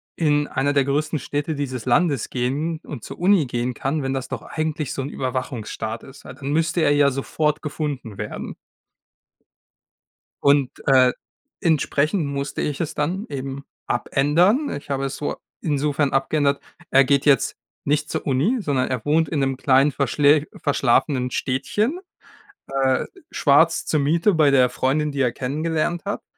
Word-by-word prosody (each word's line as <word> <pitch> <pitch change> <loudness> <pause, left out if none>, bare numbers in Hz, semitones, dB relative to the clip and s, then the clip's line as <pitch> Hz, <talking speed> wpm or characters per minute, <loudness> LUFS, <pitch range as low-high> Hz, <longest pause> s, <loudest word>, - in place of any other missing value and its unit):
in 150 -2 +2
einer 145 +2 0
der 140 -1 +3
größten 150 +2 -1
Städte 145 +5 -3
dieses 130 -4 -4
Landes 140 -1 +2
gehen 145 +6 -2
und 135 -7 -8
zur - - -9
Uni 180 -4 +4
gehen 120 0 -2
kann, 145 +6 -1
wenn 135 -1 -2
das 135 -1 -3
doch - - -4
eigentlich 155 -3 -3
so - - -3
'n 140 - -5
Überwachungsstaat 120 -4 -4
ist. 135 +1 -14
A - - -8
dann 140 0 -5
müsste 165 +2 +1
er 145 - +4
ja 145 -1 +4
sofort 150 +3 -1
gefunden 145 -8 -4
werden. 105 0 -5 1.9
Und, 140 -2 +4 0.2
äh, 130 -2 +6 0.5
entsprechend 155 0 +1
musste 140 0 -3
ich 145 0 -3
es 160 - -2
dann 180 +9 -2
eben 135 0 -5 0.2
abändern. 170 - +2
Ich 145 - -10
habe 135 0 -1
es 135 0 -3
so 145 - -3 0.2
insofern 145 -2 0
abgeändert: 140 +1 +1 0.3
Er 135 +1 +6
geht 140 +1 +2
jetzt 140 -2 +3 0.3
nicht 150 +1 0
zur - - -3
Uni, 155 - +2
sondern 140 -8 0
er 125 -3 -3
wohnt 155 +1 +2
in 150 - -2
'nem 135 -1 0
kleinen 135 +2 +3
verschlä 145 +2 +3
verschlafenen 130 -2 +1
Städtchen, 210 - -1 0.7
äh, 135 -1 +1 0.3
schwarz 160 +3 +3
zur 155 - +1
Miete 165 +8 +2
bei 155 -4 +4
der 130 -2 +4
Freundin, 145 +4 0
die 140 - -3
er 125 -3 +2
kennengelernt 155 +6 -2
hat. 205 - -3
140 Hz, 160 wpm, -22 LUFS, 135-155 Hz, 1.9 s, äh